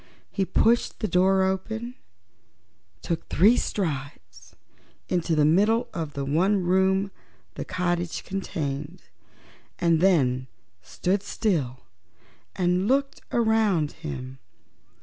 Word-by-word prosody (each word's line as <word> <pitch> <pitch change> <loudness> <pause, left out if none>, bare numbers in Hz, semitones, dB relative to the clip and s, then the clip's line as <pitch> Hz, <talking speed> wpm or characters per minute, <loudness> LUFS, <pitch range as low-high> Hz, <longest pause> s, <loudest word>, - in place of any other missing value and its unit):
He 195 - 0
pushed 230 +6 +2
the 215 - -1
door 190 +1 +3
open, 220 +6 -2 1.1
took 170 - -3
three 210 +8 +5
strides 135 - -4 0.5
into 175 -2 0
the 150 -1 +4
middle 210 +9 +3
of 160 -4 -4
the 140 -1 -3
one 185 +7 +2
room 190 +2 +2 0.4
the - - -5
cottage 175 -2 -2
contained, 155 -4 -4 0.7
and 170 -2 +2
then 130 -9 +3 0.3
stood 190 - -1
still 165 - -1 0.7
and 180 +1 +1
looked 275 +2 0
around 220 -9 +2
him. 130 -5 -7
180 Hz, 105 wpm, -25 LUFS, 150-195 Hz, 1.1 s, three